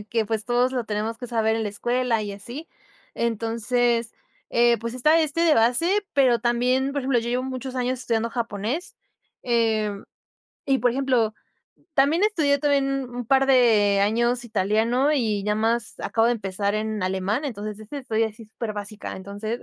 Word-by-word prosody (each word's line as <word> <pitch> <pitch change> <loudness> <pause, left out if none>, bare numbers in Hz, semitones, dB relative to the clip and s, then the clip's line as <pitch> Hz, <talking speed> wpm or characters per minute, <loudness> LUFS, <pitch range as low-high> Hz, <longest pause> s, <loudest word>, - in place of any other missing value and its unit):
que 210 - -11
que 225 -2 0
pues 220 -1 -2
todos 245 +2 +1
lo 245 -3 -2
tenemos 215 +1 -3
que 245 - -6
saber 225 -2 +1
en 225 - -1
la 210 - -2
escuela, 240 +2 0
y 205 -1 -5
así. 240 - -8 0.5
Entonces, 230 +1 0 0.4
eh, 235 -1 +4
pues, 230 +2 -5
está 305 +6 +4
este 310 +1 0
de 325 -3 +5
base, 330 - +3
pero 260 -4 +4
también, 250 +3 +1
por 285 - -1
ejemplo, 260 -2 +2
yo 235 +1 -3
llevo 250 +1 0
muchos 260 0 -5
años 250 0 -1
estudiando 230 -2 -1
japonés, 235 - -3 0.5
eh, 225 -3 +1 0.8
y 270 -1 +2
por 245 +1 +2
ejemplo, 250 -4 +1 0.6
también 295 +7 +3
estudié 315 -10 +2
también 275 -3 0
un 245 0 -6
par 270 +3 +3
de 220 -6 +4
años 235 +4 +1
italiano 225 +6 +1
y 215 -8 0
ya 210 0 0
más 225 +1 0
acabo 225 0 +1
de 240 - +3
empezar 200 -1 -2
en 215 -2 -2
alemán, 190 +8 -1
entonces 215 -4 -5
esa 220 +7 -9
es - - -6
estoy 225 -2 0
así 220 0 -5
súper 220 0 -6
básica. 205 0 -6
Entonces 205 +4 -5
235 Hz, 175 wpm, -24 LUFS, 215-255 Hz, 0.8 s, de